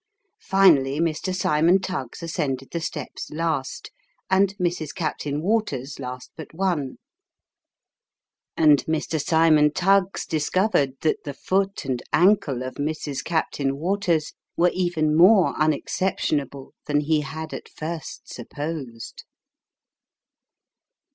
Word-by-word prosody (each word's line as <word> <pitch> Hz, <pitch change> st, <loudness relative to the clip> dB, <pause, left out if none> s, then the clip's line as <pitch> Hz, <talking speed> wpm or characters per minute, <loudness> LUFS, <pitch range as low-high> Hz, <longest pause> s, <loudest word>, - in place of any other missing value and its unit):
Finally, 155 Hz, -8 st, +4 dB
Mr. 165 Hz, +3 st, -1 dB
Cymon 170 Hz, -1 st, +3 dB
Tuggs 170 Hz, -6 st, -5 dB
ascended 140 Hz, -6 st, -3 dB
the 170 Hz, -, -3 dB
steps 150 Hz, -4 st, -5 dB
last, 155 Hz, -4 st, -3 dB, 0.4 s
and 195 Hz, +1 st, +3 dB
Mrs. 175 Hz, -5 st, -2 dB
Captain 150 Hz, -3 st, -3 dB
Waters 160 Hz, -, -1 dB
last 125 Hz, -1 st, -7 dB
but 160 Hz, 0 st, -10 dB
one; 165 Hz, -8 st, -1 dB, 1.6 s
and 150 Hz, -3 st, +5 dB
Mr. 160 Hz, -1 st, -1 dB
Cymon 155 Hz, -2 st, +4 dB
Tuggs 195 Hz, +3 st, +2 dB
discovered 155 Hz, -2 st, +1 dB
that 155 Hz, -, 0 dB
the 140 Hz, -2 st, -6 dB
foot 195 Hz, 0 st, -1 dB
and 130 Hz, -2 st, -2 dB
ankle 165 Hz, -9 st, +3 dB
of 130 Hz, -, -7 dB
Mrs. 145 Hz, -1 st, -3 dB
Captain 140 Hz, -4 st, -1 dB
Waters, 170 Hz, -2 st, 0 dB, 0.2 s
were 175 Hz, +1 st, +4 dB
even 170 Hz, -4 st, 0 dB
more 185 Hz, +3 st, +6 dB
unexceptionable 150 Hz, -4 st, -1 dB
than 145 Hz, 0 st, +2 dB
he 155 Hz, 0 st, +1 dB
had 160 Hz, +2 st, -6 dB
at -, -, -7 dB
first 160 Hz, 0 st, -7 dB
supposed. 145 Hz, -7 st, -7 dB
155 Hz, 110 wpm, -24 LUFS, 145-180 Hz, 1.6 s, more